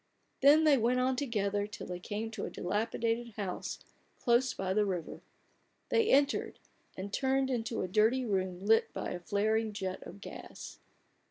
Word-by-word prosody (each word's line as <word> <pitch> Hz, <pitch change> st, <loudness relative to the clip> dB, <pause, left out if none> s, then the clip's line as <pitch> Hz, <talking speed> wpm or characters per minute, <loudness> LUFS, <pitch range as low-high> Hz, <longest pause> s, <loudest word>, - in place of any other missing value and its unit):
Then 290 Hz, +3 st, +7 dB
they 295 Hz, -4 st, +5 dB
went 245 Hz, +3 st, +2 dB
on 255 Hz, +1 st, +2 dB
together, 205 Hz, -6 st, -1 dB
till 210 Hz, -, -8 dB
they 180 Hz, -1 st, -5 dB
came 215 Hz, +4 st, -4 dB
to 220 Hz, -3 st, -4 dB
a -, -, -4 dB
dilapidated 225 Hz, +4 st, -1 dB
house 195 Hz, -4 st, -4 dB, 0.4 s
close 240 Hz, +1 st, +3 dB
by 190 Hz, -1 st, -2 dB
the 210 Hz, +1 st, +3 dB
river. 185 Hz, -5 st, -3 dB, 0.7 s
They 455 Hz, -1 st, +3 dB
entered, 280 Hz, +1 st, +2 dB, 0.4 s
and 195 Hz, +2 st, -6 dB
turned 265 Hz, 0 st, +1 dB
into 230 Hz, -1 st, -1 dB
a -, -, -2 dB
dirty 220 Hz, +7 st, +3 dB
room 190 Hz, -3 st, -2 dB
lit 225 Hz, +1 st, +4 dB
by -, -, -4 dB
a 180 Hz, -, -4 dB
flaring 215 Hz, +4 st, 0 dB
jet 190 Hz, -2 st, -4 dB
of 195 Hz, -, -10 dB
gas. -, -, -9 dB
220 Hz, 165 wpm, -32 LUFS, 200-250 Hz, 0.7 s, Then